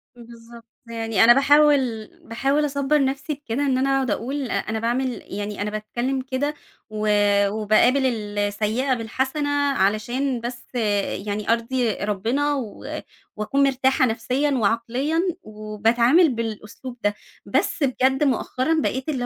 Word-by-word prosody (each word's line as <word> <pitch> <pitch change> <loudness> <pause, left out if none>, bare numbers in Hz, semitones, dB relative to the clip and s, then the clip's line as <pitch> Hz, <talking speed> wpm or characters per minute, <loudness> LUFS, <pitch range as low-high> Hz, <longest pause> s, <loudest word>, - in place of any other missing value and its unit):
بالضبط. 235 -1 -14 0.2
يعني 225 -3 +1
أنا 235 +1 +8
باحاول، 275 -5 +3 0.2
باحاول 275 +6 +1
أصبّر 280 0 +1
نفسي 275 +3 -2
بكده 280 -1 -3
إن 265 -2 +1
أنا 265 +1 +1
أقعد 265 -4 0
أقول 270 +2 -3
أ - - -1
أنا 220 +1 -2
باعمل 245 +2 -1
يعني 205 +1 -5
أنا 205 - -1
باتكلم 240 +5 -3
كده، 265 +3 -2 0.4
و 215 0 -3 0.4
وباقابل 220 +6 +3
السيئة 210 +2 -1
بالحسنة 265 +5 -2 0.2
علشان 240 +5 0
بس 240 +1 -6 0.6
يعني 210 0 -3
أرضي 235 0 -1
ربنا 225 +10 -1
و 240 -8 -5 0.5
وأكون 245 +7 0
مرتاحة 265 0 +2
نفسيًا 255 +5 0
وعقليًا، 245 +6 0 0.2
وباتعامل 225 - +2
بالأسلوب 230 +2 -6
ده. 205 0 +1 0.3
بس - - 0
بجد 265 +1 +2
مؤخرًا 275 +3 0
بقيت 260 +1 -2
اللي 260 -5 -1
245 Hz, 130 wpm, -23 LUFS, 220-270 Hz, 0.6 s, أنا